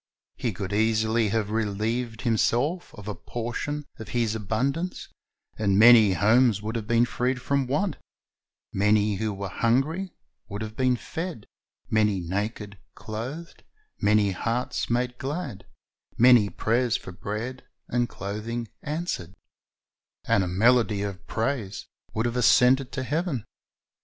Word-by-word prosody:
He 125 -4 -2
could 100 0 -5
easily 110 +1 +2
have 105 0 -1
relieved 115 +2 -1
himself 125 - +1
of 105 -1 -11
a 105 - -2
portion 120 +7 -4
of 110 - -8
his 115 -3 +1
abundance, 135 - -2 0.5
and 100 -3 +2
many 110 -2 +8
homes 110 +4 +4
would 110 +2 -4
have 110 -2 -3
been 120 +1 +4
freed 125 +1 -1
from 140 0 0
want, 180 +9 0 0.8
many 105 0 +2
who 110 +1 -1
were 100 0 -5
hungry 135 - 0 0.4
would 100 +2 -4
have 110 0 -7
been 130 -1 +2
fed, 160 - -6 0.5
many 105 -3 +3
naked 100 +3 -4 0.2
clothed, 130 +10 -7 0.4
many 105 -1 +3
hearts 115 +6 -2
made 125 +1 -1
glad, 135 - -5 0.5
many 120 -4 +6
prayers 120 +3 +1
for - - -10
bread 110 +7 -5 0.2
and 120 0 0
clothing 110 +4 -4
answered, 145 - -4 0.9
and 100 - +3
a - - -2
melody 110 +2 +3
of 100 -1 -6
praise 110 -3 -2 0.3
would 110 +1 0
have 120 +1 -1
ascended 125 +2 +4
to 130 - -2
heaven. 150 - -2
115 Hz, 130 wpm, -26 LUFS, 105-125 Hz, 0.9 s, many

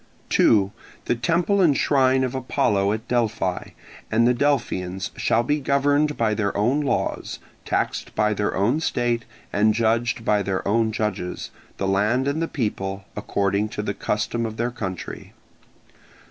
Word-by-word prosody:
2. 100 -3 +4 0.3
The - - +2
temple 170 - +1
and 150 -7 +4
shrine 130 -2 +3
of 130 0 -2
Apollo 105 -6 +1
at 110 +2 -5
Delphi 115 -6 0 0.5
and 115 +2 +4
the 125 - +4
Delphians 105 -9 -1
shall 115 - +1
be 150 +4 0
governed 145 +2 +2
by 110 -2 +2
their 100 -2 -1
own 125 +8 +2
laws, 145 - -2 0.3
taxed - - -2
by 105 0 +2
their 105 0 -1
own 115 +10 +2
state, 120 -6 0 0.3
and 105 +1 +3
judged 115 +1 +1
by 105 -1 +3
their 95 -1 -2
own 110 +2 +2
judges, 105 -5 -3 0.3
the 95 - -1
land 105 +7 +2
and 145 +3 0
the 165 - 0
people, 100 -7 -3
according 100 +1 0
to 105 - -4
the 100 - -2
custom 105 +4 -2
of 110 -1 -4
their 120 +1 -1
country. 95 -7 -6
115 Hz, 155 wpm, -23 LUFS, 100-130 Hz, 0.5 s, 2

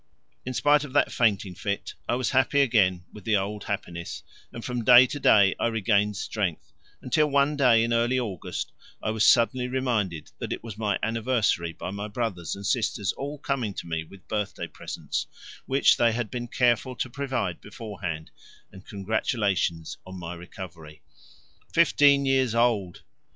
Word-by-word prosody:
In 130 - -3
spite 145 +5 +4
of 140 -3 -8
that 145 - +3
fainting 100 -5 +1
fit 100 +2 -4 0.2
I 120 - +2
was 130 0 -1
happy 135 +2 +3
again 95 -9 +3
with 105 - -11
the 110 -2 +2
old 100 +1 -4
happiness, 85 -6 -5 0.3
and 115 - -8
from 125 -2 -3
day 125 +1 +9
to 145 +3 -5
day 100 -7 +5
I - - +2
regained 105 -2 +1
strength, 95 -6 -3 0.3
until 150 +4 +2
one 140 +1 +2
day 125 -5 +5
in 115 0 0
early 120 +2 +2
August 105 -9 -4 0.3
I 110 - 0
was 110 -1 0
suddenly 125 +2 +4
reminded 115 - -2
that - - -5
it - - -4
was 115 -3 -7
my 105 -2 0
anniversary 110 -6 0
by 90 - -6
my 100 +1 -5
brothers 100 -7 -3
and 100 0 -8
sisters 105 -4 0
all 145 +2 -6
coming 130 -8 -2
to - - -6
me 80 -1 -3
with 85 0 -16
birthday 105 -2 -3
presents, - - -5 0.4
which 135 +1 +4
they 115 -1 +3
had 115 -3 -3
been 120 -1 -4
careful 125 +1 +1
to 125 - -2
provide 120 - -3
beforehand, 100 -7 -6 0.4
and 95 +1 -14
congratulations 100 -5 -1
on 95 0 -9
my 85 -1 -6
recovery. 85 -3 -10 0.7
Fifteen 145 -4 +4
years 130 -3 +2
old! 115 -7 +1
110 Hz, 165 wpm, -26 LUFS, 95-125 Hz, 0.7 s, day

